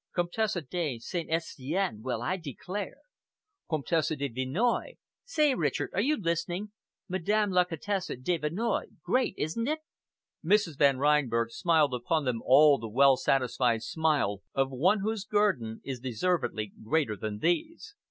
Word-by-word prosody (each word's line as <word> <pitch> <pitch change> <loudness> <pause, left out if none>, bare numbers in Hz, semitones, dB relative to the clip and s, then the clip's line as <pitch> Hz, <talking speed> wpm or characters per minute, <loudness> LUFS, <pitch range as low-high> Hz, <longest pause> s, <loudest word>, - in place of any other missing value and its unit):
"Comtesse 190 +4 0
de 160 -8 -1
St. 165 +8 -5
Estien! 160 - -2
Well, 120 -1 -3
I 185 - 0
declare!" 180 - -6 0.7
"Comtesse 155 0 0
de 140 0 -2
Vinoy. 135 - -1 0.3
Say, 305 - +2
Richard, 150 - -1
are 195 - +1
you 295 +7 +2
listening? 175 +3 -2 0.4
Madame 205 +3 +1
la 180 -1 +4
Comtesse 185 +3 -3
de 170 +7 0
Vinoy. 185 +10 -1 0.2
Great, 255 -5 +1
isn't 200 +11 -2
it!" 310 +1 -1 0.6
Mrs. 175 -4 +2
Van 140 -2 +5
Reinberg 130 -5 +2
smiled 155 0 +2
upon 140 +5 0
them 120 -3 -1
all 145 +1 +6
the 115 0 -6
well 135 +4 +5
satisfied 125 -3 +1
smile 145 - 0
of 135 0 +1
one 185 +11 +2
whose 215 0 -2
guerdon 195 - 0
is 135 -2 -5
deservedly 125 - -1
greater 130 -2 +1
than 105 +1 -4
these. 305 - -1
160 Hz, 140 wpm, -29 LUFS, 130-195 Hz, 0.7 s, all